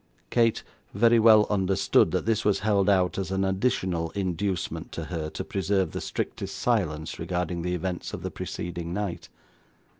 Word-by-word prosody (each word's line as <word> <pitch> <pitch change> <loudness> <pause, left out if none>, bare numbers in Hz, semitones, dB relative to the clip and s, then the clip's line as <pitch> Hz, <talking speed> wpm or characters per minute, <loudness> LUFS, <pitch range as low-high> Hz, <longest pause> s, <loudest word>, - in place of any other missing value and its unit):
Kate 115 -2 +2 0.3
very 115 +2 +5
well 110 -1 +7
understood 95 -2 +3
that - - -1
this 110 -1 +1
was 100 -2 +2
held 105 -2 +2
out 95 -2 +2
as 95 - -3
an 95 0 0
additional 95 -4 0
inducement 95 -1 -2
to 85 - -5
her 80 -2 -2
to - - -5
preserve 95 0 0
the - - -4
strictest - - -4
silence 75 +1 -1
regarding 90 0 -2
the 90 +1 -1
events 90 0 -4
of - - -6
the - - -3
preceding 85 0 -5
night. 100 -5 -4
95 Hz, 160 wpm, -26 LUFS, 85-105 Hz, 0.3 s, well